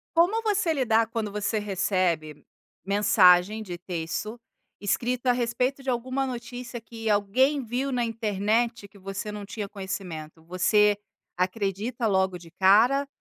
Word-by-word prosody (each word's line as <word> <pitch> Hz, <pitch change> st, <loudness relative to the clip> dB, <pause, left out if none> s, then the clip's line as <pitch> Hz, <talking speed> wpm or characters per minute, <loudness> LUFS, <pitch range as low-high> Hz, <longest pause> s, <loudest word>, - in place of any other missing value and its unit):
Como 395 Hz, +7 st, +3 dB
você 410 Hz, -5 st, +1 dB
lidar, 230 Hz, -5 st, +2 dB
quando 225 Hz, -3 st, -3 dB
você 210 Hz, +1 st, -1 dB
recebe 185 Hz, -6 st, -1 dB, 0.4 s
mensagem 200 Hz, 0 st, +4 dB
de 175 Hz, -3 st, -7 dB
texto 180 Hz, +6 st, -4 dB, 0.4 s
escrito 240 Hz, +5 st, -1 dB
a -, -, +6 dB
respeito 250 Hz, +3 st, -1 dB
de 265 Hz, -, -4 dB
alguma 255 Hz, +2 st, -1 dB
notícia 245 Hz, 0 st, -6 dB
que 225 Hz, -1 st, -6 dB
alguém 255 Hz, +8 st, +2 dB
viu 255 Hz, +4 st, -2 dB
na 245 Hz, -1 st, 0 dB
internet, 225 Hz, 0 st, -1 dB
que 200 Hz, 0 st, -19 dB
você 195 Hz, +2 st, -5 dB
não 210 Hz, -1 st, -6 dB
tinha 205 Hz, 0 st, -5 dB
conhecimento? 180 Hz, -5 st, -7 dB
Você 205 Hz, +4 st, +3 dB, 0.4 s
acredita 200 Hz, +6 st, -2 dB
logo 190 Hz, -3 st, +1 dB
de 170 Hz, -2 st, -15 dB
cara 235 Hz, +9 st, +4 dB
215 Hz, 135 wpm, -26 LUFS, 195-245 Hz, 0.4 s, a